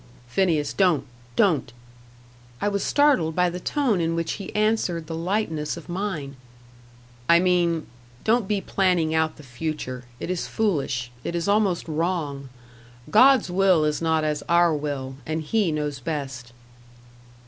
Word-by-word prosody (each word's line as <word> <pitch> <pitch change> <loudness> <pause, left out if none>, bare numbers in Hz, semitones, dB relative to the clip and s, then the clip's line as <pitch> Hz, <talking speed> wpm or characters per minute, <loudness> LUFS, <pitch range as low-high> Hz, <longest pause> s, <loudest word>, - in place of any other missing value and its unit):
"Phineas 150 -1 +1
don't 180 -6 +2 0.3
don't." 155 -10 +2 0.9
I 205 - +1
was 200 -1 -1
startled 275 - +3
by 180 -1 +2
the 180 - -5
tone 240 - 0
in 165 0 0
which 165 -1 -1
he 195 - -6
answered 210 -6 +1
the 165 - -6
lightness 165 -3 -2
of 170 - -10
mine. 175 -8 -4 0.9
"I 170 0 +7
mean 175 -3 +2 0.4
don't 225 -2 +2
be 205 -1 0
planning 180 -6 +1
out 160 0 +1
the 150 - -12
future. 130 -1 -5
It - - -3
is 185 - -2
foolish 140 - -1
it 170 - -3
is 170 +1 -1
almost 200 -5 +2
wrong. 155 -4 -2 0.6
God's 260 -2 +6
will 185 -4 +4
is 150 +1 -1
not 160 -1 +1
as 150 -1 -1
our 170 -1 +4
will; 140 -3 -4
and 160 0 -2
He 200 +2 +1
knows 150 -2 -2
best." 135 -4 -5
165 Hz, 150 wpm, -24 LUFS, 150-190 Hz, 0.9 s, I